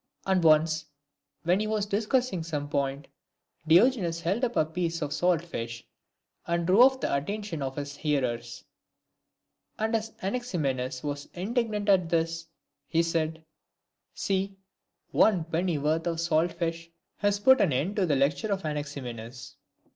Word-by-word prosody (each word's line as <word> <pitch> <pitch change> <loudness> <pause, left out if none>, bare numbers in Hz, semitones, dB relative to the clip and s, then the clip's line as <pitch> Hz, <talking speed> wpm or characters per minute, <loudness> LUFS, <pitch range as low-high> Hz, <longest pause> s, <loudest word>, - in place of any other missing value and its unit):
And 190 -2 +2
once, 155 0 +4 0.6
when 175 +3 +3
he 215 - -1
was 215 -1 0
discussing 210 0 0
some 150 -3 -4
point, 140 -1 -2 0.6
Diogenes 175 -2 +4
held 190 +9 -1
up 240 -1 0
a 155 - +3
piece 165 +1 -2
of 145 0 -3
salt 175 0 +2
fish, 115 -8 -6 0.6
and 170 0 0
drew 190 +6 +5
off 260 +1 +6
the - - 0
attention 200 +3 -3
of 135 -1 -3
his 145 0 -5
hearers; 120 -6 -2 1.1
and 220 +1 0
as 220 0 -2
Anaximenes 150 - -2
was 145 -1 -4
indignant 210 +2 -1
at 185 -4 +4
this, 165 0 -1 0.4
he 165 0 +2
said, 160 -1 -2 0.3
" - - -57
See, 195 -1 -1 0.5
one 190 -7 +4
pennyworth 160 -1 0
of 165 -1 -1
salt 165 0 +1
fish 165 -1 -3 0.3
has 205 0 +1
put 260 +5 +6
an 180 - +3
end 155 +10 0
to 190 -3 +2
the 145 - +2
lecture 140 +9 +1
of 195 -3 -1
Anaximenes." 130 -6 -6
165 Hz, 145 wpm, -28 LUFS, 150-200 Hz, 1.1 s, off